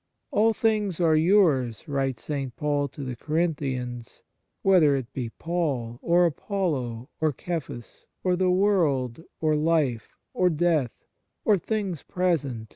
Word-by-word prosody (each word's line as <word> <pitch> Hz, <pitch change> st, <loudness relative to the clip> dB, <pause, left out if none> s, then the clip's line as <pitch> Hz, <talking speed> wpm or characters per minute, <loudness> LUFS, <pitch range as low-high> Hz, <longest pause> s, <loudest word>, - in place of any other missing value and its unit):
" -, -, -55 dB
All 220 Hz, +2 st, +4 dB
things 215 Hz, -5 st, 0 dB
are 165 Hz, -3 st, +4 dB
yours," 155 Hz, -, +3 dB
writes 135 Hz, -4 st, -2 dB
St. 135 Hz, -4 st, -4 dB
Paul 145 Hz, -1 st, 0 dB
to 140 Hz, +1 st, -9 dB
the 130 Hz, -2 st, -4 dB
Corinthians, 135 Hz, -6 st, -3 dB, 0.2 s
" -, -, -52 dB
whether 170 Hz, -7 st, +5 dB
it 130 Hz, -3 st, -5 dB
be 125 Hz, -3 st, -3 dB
Paul, 135 Hz, -7 st, -3 dB
or 175 Hz, +1 st, +4 dB
Apollo, 145 Hz, -, -2 dB
or 155 Hz, -3 st, +1 dB
Cephas, 160 Hz, -9 st, -6 dB, 0.2 s
or 180 Hz, -1 st, +2 dB
the 185 Hz, 0 st, +1 dB
world, 165 Hz, -, +1 dB, 0.2 s
or 155 Hz, -1 st, +2 dB
life, 150 Hz, -7 st, 0 dB, 0.2 s
or 180 Hz, -1 st, +3 dB
death, 160 Hz, -6 st, 0 dB, 0.4 s
or 210 Hz, -, +5 dB
things 195 Hz, -4 st, -3 dB
1 180 Hz, -4 st, +2 dB
Matt. 120 Hz, -5 st, -6 dB
155 Hz, 145 wpm, -26 LUFS, 130-180 Hz, 0.4 s, whether